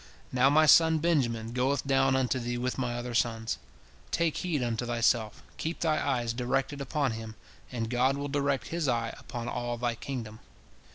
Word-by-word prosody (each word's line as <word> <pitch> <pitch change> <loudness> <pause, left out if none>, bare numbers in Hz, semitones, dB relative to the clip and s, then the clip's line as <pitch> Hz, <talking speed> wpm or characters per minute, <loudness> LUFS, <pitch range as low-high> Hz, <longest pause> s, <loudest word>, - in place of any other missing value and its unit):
Now 130 +1 +4
my 155 +2 +5
son 160 +1 +6
Benjamin 125 -9 0
goeth 130 +3 0
down 135 -1 +3
unto 130 0 +1
thee 120 0 -3
with 125 +2 -2
my 120 -2 -1
other 120 0 -4
sons. 115 -1 0 0.5
Take 165 -2 0
heed 160 -7 -1
unto 120 0 -1
thyself, 115 -2 +1
keep 165 +2 -4
thy 155 -2 +1
eyes 120 -4 0
directed 135 +3 -1
upon 140 0 0
him, 110 0 -7 0.4
and 115 -3 -2
God 125 +3 +2
will 140 0 -3
direct 140 -2 -1
His 165 -3 -1
eye 115 -2 0
upon 120 -1 -6
all 120 0 -3
thy 120 0 0
kingdom. 115 -3 -6
125 Hz, 175 wpm, -29 LUFS, 120-140 Hz, 0.5 s, son